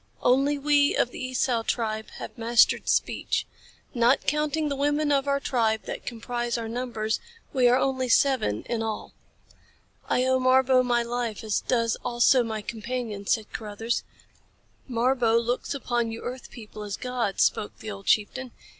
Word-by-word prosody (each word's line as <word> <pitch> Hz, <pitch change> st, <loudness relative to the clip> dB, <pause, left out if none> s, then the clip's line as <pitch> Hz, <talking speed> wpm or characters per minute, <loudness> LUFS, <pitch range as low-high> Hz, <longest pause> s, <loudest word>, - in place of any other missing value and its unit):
Only 275 Hz, +4 st, +3 dB
we 285 Hz, 0 st, +3 dB
of 245 Hz, -, +1 dB
the -, -, -7 dB
Esau 255 Hz, -2 st, 0 dB
tribe 220 Hz, -1 st, -2 dB
have -, -, -8 dB
mastered 230 Hz, -1 st, +3 dB
speech. -, -, 0 dB, 0.5 s
Not 240 Hz, +2 st, +3 dB
counting 300 Hz, +1 st, 0 dB
the 285 Hz, -, -1 dB
women 290 Hz, +2 st, +1 dB
of 280 Hz, 0 st, +2 dB
our 280 Hz, 0 st, +2 dB
tribe 225 Hz, -5 st, 0 dB
that -, -, -7 dB
comprise 240 Hz, 0 st, -3 dB
our 230 Hz, -1 st, -4 dB
numbers 225 Hz, -2 st, -2 dB, 0.3 s
we 255 Hz, -3 st, +4 dB
are 245 Hz, +1 st, +5 dB
only 260 Hz, -1 st, 0 dB
seven 245 Hz, -, +2 dB
in 235 Hz, -2 st, -3 dB
all." 220 Hz, -1 st, -4 dB, 1.0 s
"I 250 Hz, -, +2 dB
owe 260 Hz, 0 st, +3 dB
Marbo 255 Hz, 0 st, +4 dB
my 240 Hz, -1 st, +1 dB
life 235 Hz, -2 st, -3 dB
as 215 Hz, -2 st, 0 dB
does 230 Hz, -2 st, 0 dB
also 245 Hz, +2 st, +4 dB
my 220 Hz, -2 st, -3 dB
companion," 225 Hz, -2 st, -5 dB
said 220 Hz, -2 st, 0 dB
Carruthers. 225 Hz, +2 st, -3 dB, 0.9 s
"Marbo 240 Hz, -1 st, +2 dB
looks 240 Hz, +4 st, -1 dB
upon 240 Hz, -4 st, -1 dB
you 225 Hz, -, -7 dB
earth 250 Hz, 0 st, -6 dB
people 215 Hz, -2 st, -10 dB
as 205 Hz, -1 st, -4 dB
gods," 250 Hz, -6 st, 0 dB
spoke 205 Hz, -, 0 dB
the 215 Hz, -, -7 dB
old 200 Hz, -1 st, -9 dB
chieftain. 245 Hz, +4 st, +1 dB
240 Hz, 160 wpm, -26 LUFS, 225-260 Hz, 1.0 s, are